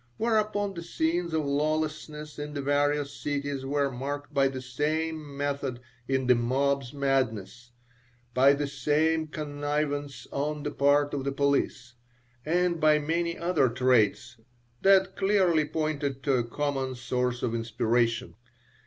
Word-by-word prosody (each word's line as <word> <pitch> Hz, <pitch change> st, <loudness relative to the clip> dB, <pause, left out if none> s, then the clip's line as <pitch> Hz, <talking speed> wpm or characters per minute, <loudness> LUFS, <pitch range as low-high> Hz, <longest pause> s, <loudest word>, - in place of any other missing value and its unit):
Whereupon 215 Hz, -3 st, +1 dB
the 170 Hz, -, -6 dB
scenes 170 Hz, +1 st, -1 dB
of 160 Hz, -2 st, 0 dB
lawlessness 150 Hz, +1 st, -2 dB
in 150 Hz, 0 st, -5 dB
the 140 Hz, -, -2 dB
various 145 Hz, 0 st, +1 dB
cities 140 Hz, -2 st, -3 dB
were 140 Hz, 0 st, +1 dB
marked 145 Hz, +3 st, -5 dB
by 135 Hz, -1 st, +4 dB
the 130 Hz, -1 st, -4 dB
same 150 Hz, +3 st, -2 dB
method 140 Hz, -3 st, -2 dB, 0.3 s
in 130 Hz, -1 st, 0 dB
the 125 Hz, -, +6 dB
mob's 135 Hz, +2 st, 0 dB
madness, 125 Hz, -5 st, -1 dB, 0.6 s
by 135 Hz, +2 st, +6 dB
the 145 Hz, +1 st, -1 dB
same 155 Hz, +3 st, +1 dB
connivance 145 Hz, -1 st, -3 dB
on 150 Hz, +1 st, -2 dB
the 145 Hz, -, -2 dB
part 145 Hz, +1 st, +3 dB
of 140 Hz, -2 st, -2 dB
the 140 Hz, -, -1 dB
police, 135 Hz, -3 st, 0 dB, 0.5 s
and 175 Hz, +1 st, +1 dB
by 155 Hz, -1 st, +5 dB
many 170 Hz, +3 st, -1 dB
other 170 Hz, -6 st, +2 dB
traits 120 Hz, -1 st, +2 dB, 0.4 s
that 190 Hz, -1 st, +4 dB
clearly 190 Hz, -6 st, +3 dB
pointed 145 Hz, -3 st, -2 dB
to 140 Hz, -, +2 dB
a 125 Hz, -2 st, +2 dB
common 135 Hz, +1 st, -2 dB
source 125 Hz, 0 st, -2 dB
of 115 Hz, -, 0 dB
inspiration. 115 Hz, 0 st, 0 dB
145 Hz, 135 wpm, -28 LUFS, 135-155 Hz, 0.6 s, the